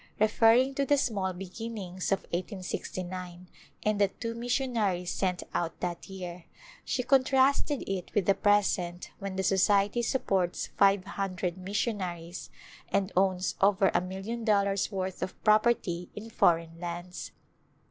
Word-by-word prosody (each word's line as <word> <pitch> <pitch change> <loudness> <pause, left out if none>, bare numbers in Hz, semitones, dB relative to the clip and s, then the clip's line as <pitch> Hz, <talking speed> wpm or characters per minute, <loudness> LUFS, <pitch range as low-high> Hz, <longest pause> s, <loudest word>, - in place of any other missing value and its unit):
Referring 225 +5 +4
to 280 - 0
the 285 +1 +3
small 200 -8 0
beginnings 190 0 -5
of 195 - +2
1869 180 -1 -5 0.4
and 210 -1 +1
the 200 - +6
two 230 +4 -5
missionaries 230 -7 0
sent 185 -2 -1
out 170 -1 -2
that 175 +2 -4
year, 180 -2 -7 0.4
she 250 - -1
contrasted 270 +2 +3
it 190 -2 -3
with 205 -4 +2
the 195 - +5
present 190 -4 +1
when 195 -2 -5
the 190 - -1
Society 200 +4 +3
supports 195 -8 0
five 195 -1 +4
hundred 190 -3 -3
missionaries, 185 -3 -3 0.4
and 195 0 +1
owns 185 0 +2
over 195 0 +4
a - - +3
million 195 +6 -5
dollars' 200 -2 +2
worth 190 -1 -3
of 190 - -4
property 215 -5 +2
in 220 +2 -8
foreign 165 -4 +2
lands. 175 +1 -6
195 Hz, 135 wpm, -29 LUFS, 180-215 Hz, 0.4 s, the